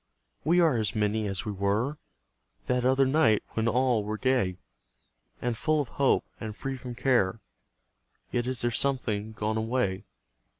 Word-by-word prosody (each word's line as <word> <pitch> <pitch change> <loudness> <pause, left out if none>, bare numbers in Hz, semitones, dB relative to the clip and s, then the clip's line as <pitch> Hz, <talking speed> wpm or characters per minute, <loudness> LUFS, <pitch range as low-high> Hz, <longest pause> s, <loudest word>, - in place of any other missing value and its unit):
We 170 +4 +3
are 160 -8 +4
as 110 -2 -1
many 105 0 0
as 95 +3 -3
we 105 - -2
were 105 +9 -1 0.7
That 125 -1 0
other 130 +2 +4
night, 135 -6 +3
when 115 0 -1
all 125 -2 +2
were 105 +1 -3
gay 125 -8 +1 0.8
And 120 -1 -1
full 155 +6 +1
of 140 -5 -2
hope, 140 -1 +2
and 110 -2 -6
free 135 +3 -4
from 125 -2 -7
care; 120 -5 +2 0.9
Yet 120 0 -1
is 130 -1 +1
there 120 - +1
something 110 -5 0
gone 110 +1 -2
away. 110 -4 -1
120 Hz, 160 wpm, -28 LUFS, 105-130 Hz, 0.9 s, are